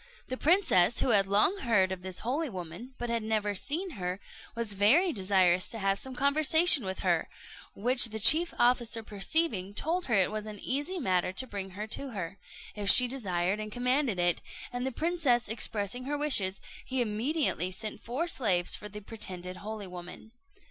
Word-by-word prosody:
The 255 - -2
princess, 270 - +3
who - - +1
had 200 -4 +4
long 210 - +2
heard 205 - +1
of 190 -1 -5
this 185 -1 -5
holy 280 +6 -2
woman, 185 +6 -9
but 240 -1 -4
had 230 -1 -1
never 215 -1 -1
seen 325 - -3
her, 180 - -5 0.4
was 230 -3 -2
very 275 - +3
desirous 185 -3 +2
to 230 - -5
have 195 -1 0
some 265 -1 -6
conversation 295 - +4
with 190 0 -5
her; 175 -3 0 0.5
which 245 +5 +4
the 220 -1 -4
chief 310 +11 +6
officer 240 -2 +1
perceiving, 205 - -1
told 340 +9 -2
her 235 - +1
it 190 -1 +3
was 215 0 -5
an 210 -1 -7
easy 290 - 0
matter 185 - 0
to 260 - 0
bring 195 -5 -7
her 210 - -4
to 260 +4 -3
her, 190 -1 -6 0.3
if 205 -1 -2
she 250 - +8
desired 195 -6 -2
and 215 0 -6
commanded 250 -1 0
it; 175 -1 +1 0.3
and 245 +1 -3
the - - -3
princess 290 -5 0
expressing 225 +2 -2
her 290 +2 -2
wishes, 205 -11 +2 0.2
he 260 0 -3
immediately 235 - 0
sent 210 +3 -6
four 265 +9 -3
slaves 190 - 0
for 210 - -8
the 210 +1 -9
pretended 185 -4 -4
holy 215 +1 -7
woman. 180 +4 -11
220 Hz, 185 wpm, -29 LUFS, 190-265 Hz, 0.5 s, she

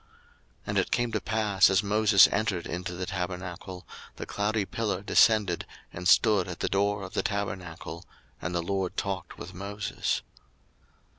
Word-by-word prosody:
02:033:009 - - -33 0.6
And - - -2
it - - 0
came 120 -1 0
to 110 -2 -1
pass, 105 -4 +3
as 95 +2 +3
Moses 105 -1 +6
entered 100 -5 0
into 90 +1 -4
the 90 +1 -3
tabernacle, 90 -1 -5 0.3
the - - -6
cloudy 105 0 -1
pillar 100 -3 -2
descended, 105 -4 +3 0.3
and 90 +1 -3
stood 105 -2 +5
at 90 -2 -6
the - - +1
door 100 +1 +1
of 95 - -8
the - - +1
tabernacle, 90 -5 -4 0.4
and 90 +2 -3
the 85 - 0
Lord 95 0 -2
talked 95 -3 -3
with 90 - -8
Moses. 100 +3 -3
95 Hz, 160 wpm, -28 LUFS, 90-105 Hz, 0.6 s, Moses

